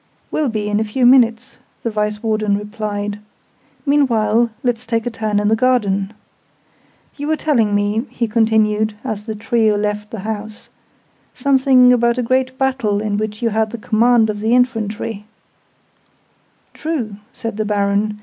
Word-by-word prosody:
"Will 300 -4 0
be 215 -2 -3
in 210 0 0
a - - +1
few 230 +4 0
minutes," 245 0 +3 0.3
the 230 - -1
Vice 210 0 -2
Warden 215 -2 +1
replied. 210 0 -4 0.7
"Meanwhile, 235 -5 +2
let's 245 -1 -1
take 230 -1 -1
a 245 - -2
turn 215 -2 -1
in 205 - 0
the 220 - +3
garden. 210 -5 +1 1.1
You 290 0 -4
were 315 - +2
telling 235 -10 +1
me," 205 +4 0
he 235 - -2
continued, 215 -1 +2
as 210 -1 -4
the 220 -2 -4
trio 220 0 +1
left 210 0 -2
the 225 - -6
house, 215 0 -6 0.7
"something 265 -2 +4
about 235 0 +2
a 250 - 0
great 255 +2 0
battle 260 -7 0
in 210 -1 -2
which 215 +1 -4
you 230 - +1
had 220 +1 0
the 235 - -6
command 225 +1 +3
of 205 - -7
the 220 +3 +2
infantry 225 -4 -1 0.7
" - - -41 0.7
"True," 255 -11 -4
said 225 -4 -6
the 215 - -1
Baron. 205 0 0
220 Hz, 160 wpm, -18 LUFS, 210-245 Hz, 1.1 s, something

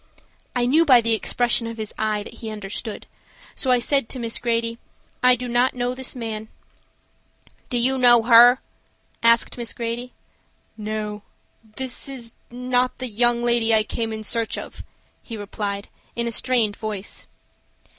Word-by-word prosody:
I 245 -1 +1
knew 300 +7 +4
by 260 -6 +7
the 230 0 +1
expression 235 +1 +1
of 230 0 -7
his 215 -1 -5
eye 215 -1 -1
that - - -12
he 225 - -6
understood, 210 +1 -6 0.5
so 265 - -1
I 250 - +5
said 275 0 0
to - - -4
Miss 230 -2 -2
Grady: 230 -1 -1 0.4
"I 250 0 +6
do 250 +1 -6
not 245 +2 +2
know 245 0 -1
this 260 +1 -6
man." 220 -3 -5 1.2
"Do 245 - 0
you 260 +2 +3
know 240 -2 +7
her?" 240 +2 +7 0.6
asked 230 +1 +3
Miss 235 -2 -3
Grady. 240 +1 -4 0.6
"No; 210 -1 -4 0.5
this 260 +1 -2
is 240 -4 -6 0.2
not 250 +1 0
the 255 -1 -5
young 240 +2 +2
lady 235 -2 +3
I 215 - +3
came 225 +1 -3
in 220 0 -5
search 230 +1 0
of," - - -8 0.4
he 230 - -8
replied, 200 0 -4 0.3
in 235 - -1
a 235 - -1
strained 230 -4 +1
voice. 210 -3 -5
235 Hz, 160 wpm, -23 LUFS, 220-245 Hz, 1.2 s, by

